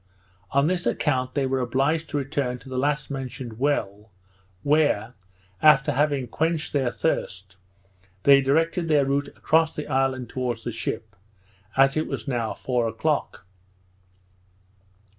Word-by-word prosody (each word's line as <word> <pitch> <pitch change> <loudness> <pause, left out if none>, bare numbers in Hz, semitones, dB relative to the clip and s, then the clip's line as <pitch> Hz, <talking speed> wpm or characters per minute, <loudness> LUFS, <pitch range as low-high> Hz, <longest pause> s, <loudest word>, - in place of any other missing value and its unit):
On 140 +1 +2
this 175 +2 0
account 130 -4 0
they 140 -2 +1
were 130 0 0
obliged 135 +6 0
to 145 - -2
return 135 -2 -2
to 125 - -14
the 130 -1 -2
last 145 +1 -1
mentioned 130 -4 -6
well, 110 -7 -1 0.5
where, 145 -7 +2 0.5
after 150 -1 +6
having 140 -2 +1
quenched 160 +2 -1
their 135 -4 +1
thirst, 95 -4 -3 0.7
they 140 -1 +7
directed 165 +5 +1
their 150 -3 +3
route 140 +1 0
across 160 0 +2
the 150 - -4
island 135 -2 0
towards 125 -3 -3
the 120 - -3
ship, 110 -1 -5 0.6
as 135 0 +5
it 155 - 0
was - - -5
now 120 -4 -2
four 125 -3 -1
o'clock. 110 -4 -2
135 Hz, 140 wpm, -25 LUFS, 125-150 Hz, 0.7 s, they